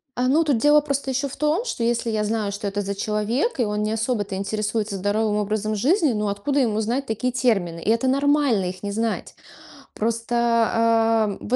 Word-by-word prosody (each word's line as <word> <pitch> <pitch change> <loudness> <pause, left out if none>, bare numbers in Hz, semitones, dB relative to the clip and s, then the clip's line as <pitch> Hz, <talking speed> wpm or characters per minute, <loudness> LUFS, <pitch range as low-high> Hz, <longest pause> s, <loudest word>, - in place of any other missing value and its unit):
А, 250 +1 0
ну, 300 +5 +3
тут 285 -6 +1
дело 295 +4 +5
просто 280 -2 -2
ещё 270 +2 -1
в - - -9
том, 300 - +1
что, 245 - -3
если 235 0 0
я 215 -1 0
знаю, 210 -1 -1
что 205 +1 -4
это 200 +1 -2
за 200 0 -4
человек, 215 - -1
и 240 - +3
он 210 0 -2
не 215 - -1
особо-то 220 -3 -2
интересуется 210 +1 -2
здоровым 205 +2 0
образом 215 +1 -1
жизни, 290 - +2
ну, 210 -1 -1
откуда 205 +9 -1
ему 220 -5 +1
знать 245 +6 -1
такие 235 +2 -2
термины? 205 -10 0
И 200 - -2
это 230 +4 +2
нормально 275 -6 +2
их 185 +1 -6
не 200 - -3
знать. 225 +1 -3 0.6
Просто, 230 +2 -2 0.4
ам, 225 -2 +2
в 245 - -1
225 Hz, 205 wpm, -23 LUFS, 210-260 Hz, 0.6 s, дело